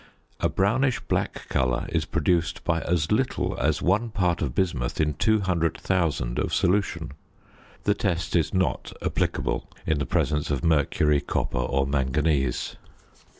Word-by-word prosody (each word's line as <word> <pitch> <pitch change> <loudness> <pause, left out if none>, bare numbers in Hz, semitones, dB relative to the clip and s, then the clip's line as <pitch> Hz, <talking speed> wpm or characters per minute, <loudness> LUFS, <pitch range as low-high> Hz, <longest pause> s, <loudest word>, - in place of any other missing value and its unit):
A - - +1
brownish 120 +7 +1
black - - -2
colour 65 -2 0
is - - 0
produced 85 -1 0
by 85 -2 +1
as 85 -3 0
little 125 +5 0
as 75 +3 +1
one 105 +6 +2
part 90 -6 0
of 65 -3 -2
bismuth 75 -10 -1
in 75 -1 +2
200,000 85 - 0
of - - -1
solution. 85 -5 +1 0.7
The 105 - +3
test 90 -4 -1
is 80 -3 +2
not 95 -2 -1
applicable - - -1 0.2
in 80 -2 +1
the 70 - -2
presence 75 0 0
of 70 -4 -1
mercury, 75 -2 +2
copper, - - -2
or 70 +2 +1
manganese. 70 0 0
80 Hz, 140 wpm, -25 LUFS, 70-95 Hz, 0.7 s, The